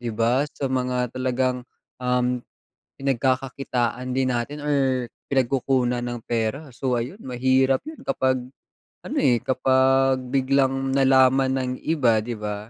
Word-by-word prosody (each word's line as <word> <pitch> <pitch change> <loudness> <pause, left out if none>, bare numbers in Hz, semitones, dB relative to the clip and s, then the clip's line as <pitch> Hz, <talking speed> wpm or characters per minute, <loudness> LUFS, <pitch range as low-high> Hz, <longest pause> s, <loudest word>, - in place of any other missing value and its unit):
di 120 - -4
ba. 115 +5 +2
Sa 135 - -2
mga 125 -1 -1
talagang, 130 -1 -1 0.4
um, 125 0 0 0.6
pinagkakakitaan 130 -2 -1
din 130 -1 +1
natin 125 +5 -3
or 135 -4 0 0.2
pinagkukunan 130 -1 +1
ng 120 -1 -4
pera, 120 +6 -2
so 125 +1 -2
ayun 120 - -3
mahirap 130 +1 +2
'yun 315 0 -9
kapag 130 -1 +1 0.7
ano, - - -5
eh, 120 -2 +2
kapag 130 0 +3
biglang 135 0 +1
nalaman 130 0 +4
ng 130 -1 -2
iba, 125 -9 +2
di 120 +1 -4
ba? 105 -1 -3
130 Hz, 130 wpm, -24 LUFS, 125-135 Hz, 0.7 s, nalaman